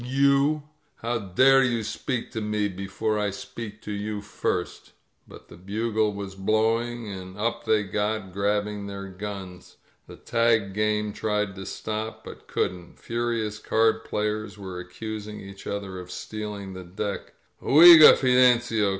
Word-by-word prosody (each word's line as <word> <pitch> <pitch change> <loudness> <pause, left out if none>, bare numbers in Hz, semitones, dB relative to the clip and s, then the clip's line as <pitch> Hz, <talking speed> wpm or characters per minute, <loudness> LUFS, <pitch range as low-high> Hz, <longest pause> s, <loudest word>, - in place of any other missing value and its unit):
You! 140 +3 +2 0.4
How 115 0 0
dare 130 +8 +4
you 120 -3 0
speak 115 +3 -4
to 110 - -4
me 105 -1 0
before 100 +3 -2
I 105 -1 0
speak 115 -1 -8
to 105 - -6
you 105 0 -4
first 100 - -3
^" - - -22 0.4
But - - -14
the - - -13
bugle 110 +3 -1
was 100 -1 -6
blowing, 110 +4 0
and 95 -1 -8
up 115 +2 -2
they 110 -1 +3
got, 105 -1 -2
grab 105 +1 +1
bing 105 -1 -6
their 100 0 -6
guns. 95 -2 -8 0.3
The - - -11
tag 115 -4 +1
game 105 0 0
tried 105 -2 -1
to 95 0 -8
stop, 110 +1 -5
but - - -11
couldn't. 90 -1 -3
Furious 115 -2 -2
card 110 0 +2
players 105 0 -3
were 95 -3 -7
accusing 105 +3 -7
each 100 0 -11
other 100 -2 -4
of 90 0 -10
stealing 105 0 -6
the 95 0 -8
deck. 100 +3 -5 0.3
Oiga, 160 +1 +9
Fidencio!" 125 -4 +3
105 Hz, 150 wpm, -25 LUFS, 100-115 Hz, 0.4 s, Oiga